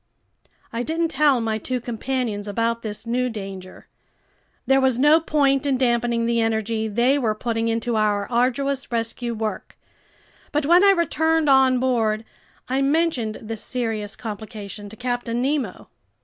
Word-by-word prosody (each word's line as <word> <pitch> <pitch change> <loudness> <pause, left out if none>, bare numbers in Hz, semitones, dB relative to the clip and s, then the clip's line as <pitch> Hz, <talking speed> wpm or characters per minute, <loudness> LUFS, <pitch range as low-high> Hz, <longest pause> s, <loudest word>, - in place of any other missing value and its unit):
I 230 - -2
didn't 325 +5 -1
tell 285 -3 +3
my 220 -1 -1
two 255 +4 -3
companions 235 -3 -3
about 230 +3 -1
this 215 +1 -6
new 250 +2 0
danger. 195 -4 -8 0.8
There 270 0 +4
was 260 -2 +2
no 295 +5 +5
point 280 -4 +2
in 270 -2 +2
dampening 240 -2 +1
the 235 0 +1
energy 220 0 0
they 240 +6 +2
were 220 -5 0
putting 225 0 -2
into 230 +1 -1
our 210 -2 +1
arduous 260 +3 0
rescue 235 +1 -2
work. 215 -1 -5 0.7
But 295 0 0
when 350 +5 +6
I 400 - +7
returned 320 -3 +2
on 265 -1 +5
board, 225 -4 0 0.4
I 265 +2 0
mentioned 275 -6 +1
this 220 0 -6
serious 225 -4 -3
complication 210 -2 -7
to 220 - -11
Captain 245 -1 -2
Nemo. 275 +2 -2
240 Hz, 150 wpm, -23 LUFS, 220-270 Hz, 0.8 s, I